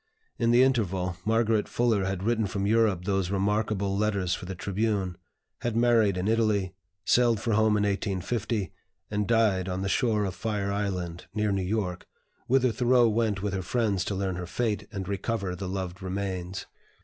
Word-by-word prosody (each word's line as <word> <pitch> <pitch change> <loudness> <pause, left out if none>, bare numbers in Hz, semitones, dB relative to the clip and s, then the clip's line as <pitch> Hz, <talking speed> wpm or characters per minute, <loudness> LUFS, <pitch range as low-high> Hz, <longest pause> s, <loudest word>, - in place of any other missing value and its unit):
In 115 -2 +2
the 120 +2 +6
interval, 95 -8 0
Margaret 110 -1 +2
Fuller 105 -2 +1
had 95 -1 -2
written 110 -1 +1
from 100 +1 -2
Europe 105 -4 +2
those 95 -3 0
remarkable 100 0 0
letters 100 -4 0
for 90 - -5
the 95 - -5
"Tribune," 100 -1 -1 0.4
had 120 -2 -2
married 115 -5 +4
in 90 +2 -1
Italy, 110 -4 +1 0.3
sailed 120 -3 +4
for 115 - -1
home 110 0 +3
in 105 - +1
1850, 100 +1 -1 0.4
and 105 -1 0
died 105 -5 +2
on 95 +1 -2
the - - -1
shore 110 -2 +1
of 95 - -3
Fire 100 0 -2
Island, 90 -4 -3
near 105 -1 +1
New 100 -1 0
York, 90 -2 -2 0.4
whither 130 -1 +3
Thoreau 120 +1 +4
went 105 -3 0
with 100 -2 -1
her 95 - -1
friends 105 -2 0
to 100 - -2
learn 95 -2 -2
her 90 -1 -5
fate, 110 +3 -2
and 95 -2 -5
recover 100 -1 -2
the 95 0 -5
loved 95 0 -4
remains. 95 -1 -4
100 Hz, 175 wpm, -27 LUFS, 95-110 Hz, 0.4 s, the